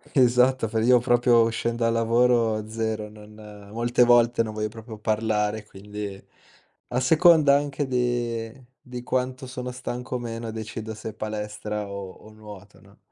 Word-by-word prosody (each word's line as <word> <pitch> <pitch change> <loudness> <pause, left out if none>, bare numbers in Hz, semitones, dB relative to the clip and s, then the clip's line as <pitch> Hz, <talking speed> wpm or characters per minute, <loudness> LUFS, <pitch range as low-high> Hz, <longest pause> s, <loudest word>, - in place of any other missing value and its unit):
Esatto, 125 -1 +4
fai 110 0 -1
io 125 -1 +6
proprio 120 0 +4
uscen 115 +1 -1
dal 115 -1 +1
lavoro, 115 -1 +2
0, 110 -1 -3
non 105 -1 -13
molte 120 +2 +2
volte 120 -1 +4
non 110 -1 -6
voglio 110 0 -2
proprio 110 0 -10
parlare, 110 -1 -1
quindi 100 0 -8 0.7
a 125 - -2
seconda 155 0 +5
anche 145 0 -2
de 120 -1 -2 0.2
di 125 -1 -8
quanto 130 +1 -2
sono 125 0 -6
stanco 125 0 -6
o - - -3
meno 115 -1 -5
decido 110 0 -6
se 110 +1 -7
palestra 105 -1 -4
o 100 -1 -6 0.2
o - - -13
nuoto, 105 -2 -13
no? - - -21
115 Hz, 150 wpm, -25 LUFS, 110-125 Hz, 0.7 s, io